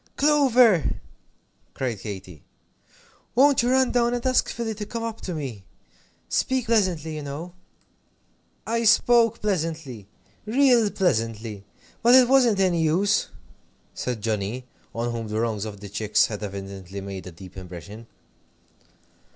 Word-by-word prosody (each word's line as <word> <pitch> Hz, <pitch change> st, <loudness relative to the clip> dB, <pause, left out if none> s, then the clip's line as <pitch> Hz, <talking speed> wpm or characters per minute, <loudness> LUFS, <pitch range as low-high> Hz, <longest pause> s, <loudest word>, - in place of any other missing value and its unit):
"Clover!" 255 Hz, -, +4 dB, 0.8 s
cried 120 Hz, -6 st, -3 dB
Katy, 95 Hz, -6 st, -8 dB, 0.9 s
"won't 275 Hz, +2 st, +5 dB
you 240 Hz, -, 0 dB
run 260 Hz, 0 st, +3 dB
down 240 Hz, 0 st, +2 dB
and 240 Hz, -, -5 dB
ask 255 Hz, 0 st, +2 dB
Philly 230 Hz, -2 st, -3 dB
to 210 Hz, 0 st, -6 dB
come 230 Hz, +1 st, -5 dB
up 225 Hz, -1 st, -5 dB
to 180 Hz, -, -5 dB
me? 130 Hz, -10 st, -6 dB, 0.6 s
Speak 260 Hz, -2 st, 0 dB
pleasantly, 185 Hz, -9 st, 0 dB
you 155 Hz, -, -5 dB
know!" 145 Hz, +5 st, -7 dB, 1.1 s
"I 230 Hz, +1 st, -1 dB
spoke 230 Hz, +1 st, +4 dB
pleasantly 160 Hz, -, -3 dB, 0.4 s
real 245 Hz, -2 st, +4 dB
pleasantly, 115 Hz, -, -1 dB, 0.4 s
but 240 Hz, +2 st, +6 dB
it 255 Hz, -1 st, +7 dB
wasn't 245 Hz, -6 st, +4 dB
any 180 Hz, -3 st, +2 dB
use," 185 Hz, +7 st, +2 dB, 0.7 s
said 120 Hz, -4 st, -4 dB
Johnnie, 110 Hz, +3 st, -2 dB, 0.3 s
on 120 Hz, +1 st, -2 dB
whom 115 Hz, -1 st, -4 dB
the 105 Hz, +1 st, -2 dB
wrongs 110 Hz, -2 st, -1 dB
of 100 Hz, -2 st, -8 dB
the 105 Hz, -, -7 dB
chicks 105 Hz, +1 st, +2 dB
had 105 Hz, -2 st, -6 dB
evidently 100 Hz, -1 st, -7 dB
made 95 Hz, -1 st, -7 dB
a -, -, -8 dB
deep 90 Hz, +2 st, -13 dB
impression. 95 Hz, +5 st, -10 dB
155 Hz, 135 wpm, -24 LUFS, -, 1.1 s, it